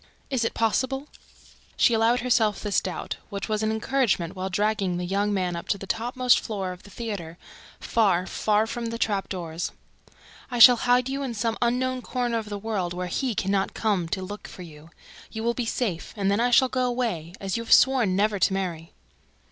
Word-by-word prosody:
"Is 255 -3 +1
it 230 - -1
possible?" 265 +5 0 0.7
She 240 - +4
allowed 225 +2 +3
herself 230 -4 +2
this 210 -2 +1
doubt, 185 - -5
which 200 -1 -4
was 215 -1 -1
an 215 - +1
encouragernent, 220 -6 0
while 190 0 -3
dragging 200 -2 0
the 180 - -3
young 200 +3 0
man 185 -3 -1
up 170 - -6
to - - 0
the 195 - -8
topmost 245 +5 +2
floor 195 -5 -4
of 180 0 -10
the - - -15
theater, 200 -7 -6 0.4
far, 200 -6 +2
very - - -8
far 215 +2 +1
from 235 +1 -4
the 230 0 -4
trap 205 -4 -1
doors. 170 -2 -4 0.8
"I 245 - -3
shall 240 +1 +9
hide 250 +1 +4
you 275 +1 -3
in 255 -4 -3
some 225 +1 -1
unknown 255 +2 0
corner 240 -2 -1
of 215 -2 -8
the 205 - -4
world, 195 -5 -3
where 180 0 -3
HE 230 +6 -2
can 195 0 -1
not 195 -1 0
come 195 -7 0
to 190 +2 -2
look 205 +3 -7
for 180 - -10
you. 155 -1 -13 0.4
You 220 -1 -5
will 235 +1 +1
be 240 -1 -3
safe; 205 -9 -3
and 195 -1 +1
then 200 - +1
I 245 +1 +3
shall 260 +2 +5
go 255 0 0
away... 220 -9 -2
as 195 -1 -3
you 230 - -2
have 230 - -8
sworn 245 -8 +5
never 205 +1 +1
to 190 - +3
marry." 175 -4 -4
215 Hz, 210 wpm, -25 LUFS, 190-240 Hz, 0.8 s, shall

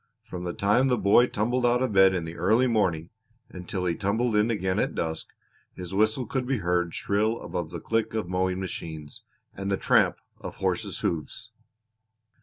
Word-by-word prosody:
From 90 0 -7
the 85 - -3
time 105 +7 +2
the 125 -2 +2
boy 105 +4 +5
tumbled 120 +4 -1
out 120 +1 +3
of 125 -5 -1
bed 95 -1 +6
in 85 -2 -2
the 80 +1 -7
early 110 +9 +3
morning 95 -9 0 0.4
until 90 0 -5
he 85 - +1
tumbled 110 +5 0
in 105 +2 +3
again 95 -4 0
at - - -1
dusk 80 -1 -3 0.5
his 90 0 -7
whistle 110 +5 +1
could 125 +2 -3
be 135 -1 +1
heard 90 -3 -1
shrill 110 +3 0
above 85 -3 -4
the 85 0 -6
click 115 +4 -1
of 110 -5 -2
mowing 90 0 -1
machines, 80 -5 -7 0.3
and 95 +1 -5
the 100 - +1
tramp - - +3 0.2
of - - -8
horses' - - -2
hoofs. 80 -4 -4
95 Hz, 185 wpm, -26 LUFS, 90-115 Hz, 0.5 s, bed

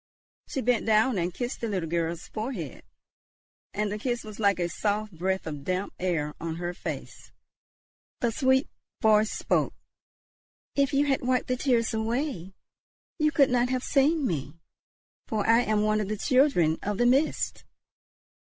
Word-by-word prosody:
She 265 - -3
bent 245 -1 +1
down 220 0 +3
and 175 +1 -1
kissed 245 +7 -4
the 230 - -1
little 185 -6 -2
girl's 170 0 -2
forehead, 215 - -5 0.9
and 210 0 -1
the 210 - -3
kiss 240 +1 -2
was 215 0 -10
like 200 -3 +3
a 175 -1 0
soft 210 +4 -1
breath 190 +3 -1
of 150 -3 -6
damp 185 +4 -2
air 165 -5 -1
on 165 -1 -3
her 175 +1 -3
face. - - -7 0.9
The 235 - +1
sweet 260 +2 +2 0.3
voice 215 0 +4
spoke. - - 0 1.0
"If 280 -1 +2
you 285 0 +3
had 270 -2 +1
wiped 255 0 0
the 255 - +2
tears 245 -4 +1
away, 220 - -2 0.6
you 305 0 +3
could 280 -5 +4
not 245 0 +2
have 255 -1 -1
seen 290 +2 +2
me, 150 - -3 0.7
for 215 -2 -1
I 230 +1 +5
am 215 -3 +1
one 215 0 +2
of 205 - -3
the 215 +1 -2
children 250 - +3
of 205 0 -2
the 240 - +2
Mist. 270 +5 +1
215 Hz, 165 wpm, -27 LUFS, 185-255 Hz, 1.0 s, I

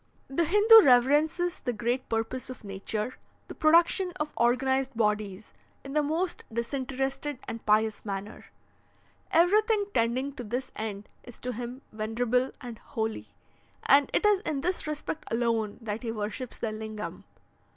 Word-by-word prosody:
"The 325 +5 +1
Hindoo 420 +6 +8
reverences 295 +6 +3
the 245 - -2
great 240 +4 -2
purpose 225 +3 -2
of 255 - -9
nature, 210 +4 -4 0.3
the - - -7
production 340 +3 +4
of 300 0 -3
organized 265 +2 +1
bodies, 210 -2 -1 0.3
in 275 - -8
the 300 - +3
most 325 +5 -2
disinterested 270 +4 -3
and 230 - -6
pious 215 0 +2
manner. 200 +1 -6 0.8
Everything 415 +5 +3
tending 250 +4 0
to 255 - -7
this 245 +4 -4
end 210 -1 -5
is 245 - -13
to 250 0 -3
him 245 +3 -6
venerable 235 +4 0
and 235 -3 -8
holy, 220 -1 -4 0.6
and 280 +1 +5
it - - +1
is 415 -2 +5
in 300 -8 -3
this 360 0 -2
respect 305 +1 -4
alone 230 -2 0
that 215 0 -3
he 235 -3 -3
worships 220 +3 -5
the 225 - -2
Lingam. 215 -1 -6
250 Hz, 145 wpm, -28 LUFS, 220-295 Hz, 0.8 s, Hindoo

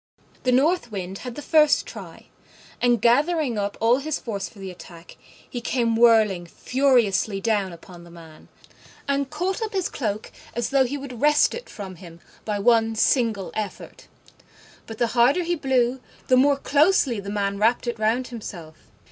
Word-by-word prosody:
The 255 - +1
North 275 0 +2
Wind 190 -1 -5
had 250 -2 -7
the 295 - -7
first 305 -2 +4
try; - - -11 0.6
and, 245 -1 +3
gathering 280 0 +2
up 200 0 -3
all 230 +2 +4
his 300 +2 -3
force 205 -4 -5
for - - -20
the 195 -1 -7
attack, 170 -1 -13 0.3
he 245 - -6
came 235 -1 0
whirling 220 -6 +4
furiously 235 -4 +1
down 205 -3 0
upon 170 +1 -13
the 170 - -14
man, 165 -2 -15 0.6
and 280 -1 0
caught 360 +7 -2
up 440 -1 -3
his 380 -3 -1
cloak 215 -4 -4 0.2
as 240 +3 -2
though 270 -1 +4
he 275 +4 -3
would 260 -4 -9
wrest 295 0 +4
it 480 +1 -8
from 190 -3 -8
him 170 -2 -13 0.3
by 210 -1 -1
one 225 +1 +2
single 220 -4 +1
effort: 210 -3 -7 0.8
but 225 - -8
the 240 - +2
harder 255 +9 +3
he 345 +1 -1
blew, 265 -4 0 0.3
the 255 - +6
more 275 +2 +4
closely 285 - +2
the 200 0 -7
man 200 -1 -2
wrapped 230 +4 +2
it 235 -2 -3
round 230 +4 0
himself. 175 -9 -10
235 Hz, 175 wpm, -23 LUFS, 200-275 Hz, 0.8 s, the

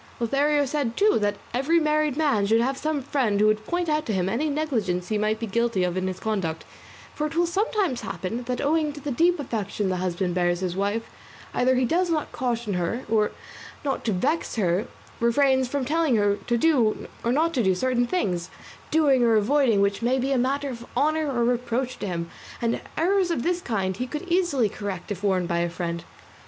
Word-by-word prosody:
Lothario 285 +5 +2
said, 270 -4 -2
too, 415 - +4
that 205 0 0 0.2
every 280 +7 +2
married 305 -2 +1
man 275 -11 +2
should 225 +2 +4
have 260 +3 +1
some 305 -1 -2
friend 245 -7 0
who 210 - +4
would 215 0 +1
point 350 0 -1
out 305 0 +1
to 220 - 0
him 185 -1 0
any 260 +10 0
negligence 230 - -1
he 215 - +1
might 215 +1 0
be 230 - -2
guilty 230 -2 0
of 180 -1 -1
in 185 0 -1
his 185 0 -4
conduct, 190 -8 -2 0.5
for 300 - -1
it 315 - -8
will 345 +1 +3
sometimes 380 - 0
happen 225 +6 -4
that 250 0 -2
owing 305 +1 +1
to 290 - -9
the 290 0 -4
deep 340 +6 +3
affection 210 -6 -2
the 185 - -1
husband 180 0 -1
bears 175 0 +1
his 180 -2 -2
wife 205 +4 0 0.5
either 255 +1 +3
he 255 0 +2
does 350 +6 +1
not 315 -2 -1
caution 235 -4 -2
her, 180 +8 -2
or, 215 -1 +2 0.6
not 275 - -1
to 225 - 0
vex 210 - 0
her, 195 +1 +1 0.3
refrains 260 +2 +3
from 275 +1 -2
telling 310 -2 +2
her 205 -1 +2
to 240 - +2
do 250 -7 +2 0.2
or 235 - +1
not 320 +5 +2
to 255 - +1
do 190 -3 +2
certain 245 +3 +1
things, 180 - -1 0.4
doing 290 -5 +4
or 230 -2 +4
avoiding 230 -1 +3
which 200 +1 +1
may 245 +3 +2
be 265 +2 -1
a 270 - +2
matter 275 +3 0
of 235 -1 -8
honour 310 0 +1
or 240 -2 +1
reproach 245 +1 -1
to - - -3
him; 170 -2 -3 0.3
and 235 0 -1 0.2
errors 370 +2 +2
of 325 -8 -1
this 355 0 0
kind 190 - -2
he 250 - -3
could 300 +3 -5
easily 345 - +2
correct 200 -1 -6
if 195 -2 -4
warned 185 -3 +1
by 170 -1 0
a 170 0 0
friend. 170 -1 -4
240 Hz, 215 wpm, -25 LUFS, 205-295 Hz, 0.6 s, too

